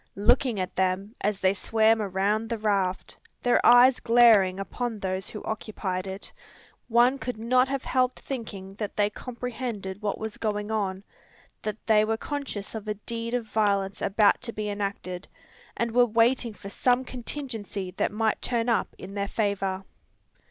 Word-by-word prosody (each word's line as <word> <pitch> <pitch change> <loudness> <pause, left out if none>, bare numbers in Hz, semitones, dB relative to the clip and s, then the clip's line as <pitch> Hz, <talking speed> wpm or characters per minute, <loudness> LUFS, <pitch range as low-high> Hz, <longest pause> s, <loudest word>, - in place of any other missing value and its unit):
Looking 235 +1 +3
at 185 - -3
them, 190 +3 0
as 205 -1 0
they 185 0 +4
swam 220 +2 +2
around 205 +3 0
the 230 - -1
raft, 200 -4 -1 0.3
their 245 - +3
eyes 245 +1 +7
glaring 225 -6 +5
upon 230 +3 -3
those 190 -1 -3
who 210 - -8
occupied 200 -4 -3
it, 190 +1 -8 0.5
one 245 +3 +4
could 250 -3 -4
not 250 +3 +3
have 275 -1 -2
helped 255 -1 0
thinking 205 -7 -6
that 210 -3 -4
they 205 0 +2
comprehended 235 -5 -5
what 205 -2 -1
was 220 -1 -5
going 210 -1 -2
on, 195 -3 -1 0.6
that 215 0 -5
they 215 -1 +5
were 220 +1 0
conscious 275 -7 -5
of 220 -1 -6
a 210 - -1
deed 230 +3 -4
of 240 -2 -2
violence 200 -3 0
about 205 +1 +3
to 245 - -5
be 215 -2 -3
enacted, 200 -2 -4 0.5
and 235 0 0
were 245 +2 +5
waiting 230 0 +2
for 200 - -9
some 250 +5 +1
contingency 230 -7 -5
that - - +1
might 220 +1 0
turn 240 -1 0
up 230 - 0
in 190 +1 -9
their 200 0 -2
favour! 195 -3 -1
215 Hz, 165 wpm, -27 LUFS, 200-235 Hz, 0.6 s, eyes